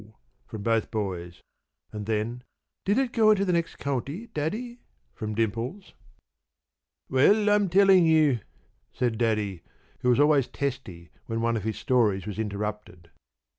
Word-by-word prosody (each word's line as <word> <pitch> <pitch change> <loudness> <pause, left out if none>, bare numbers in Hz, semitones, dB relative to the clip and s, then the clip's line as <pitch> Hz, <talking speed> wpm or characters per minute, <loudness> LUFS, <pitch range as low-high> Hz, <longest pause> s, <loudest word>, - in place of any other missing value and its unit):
from 105 -2 -7
both 115 0 +1
boys, 90 -5 -4 0.5
and 105 -1 -6
then: 110 +3 -2 0.4
"Did 200 +2 +2
it 265 -2 +1
go 220 -2 +4
into 200 -2 +4
the 180 - +1
next 170 -1 -1
county, 140 - -3
Daddy?" 230 +11 -3 0.3
from 110 - -5
Dimples. 115 - -3 1.1
"Well, 205 +11 +4
I'm 205 -2 +3
telling 190 -1 +5
you!" 155 -6 +4 0.5
said 120 -3 -1
Daddy, 105 -6 0 0.4
who 125 0 0
was 125 - +3
always 145 -3 +4
testy 115 -12 -5 0.2
when 115 -1 -2
one 115 0 +1
of 110 -2 -3
his 110 - -2
stories 110 -7 +1
was 105 0 -6
interrupted. 105 -4 -5
120 Hz, 140 wpm, -26 LUFS, 105-170 Hz, 1.1 s, telling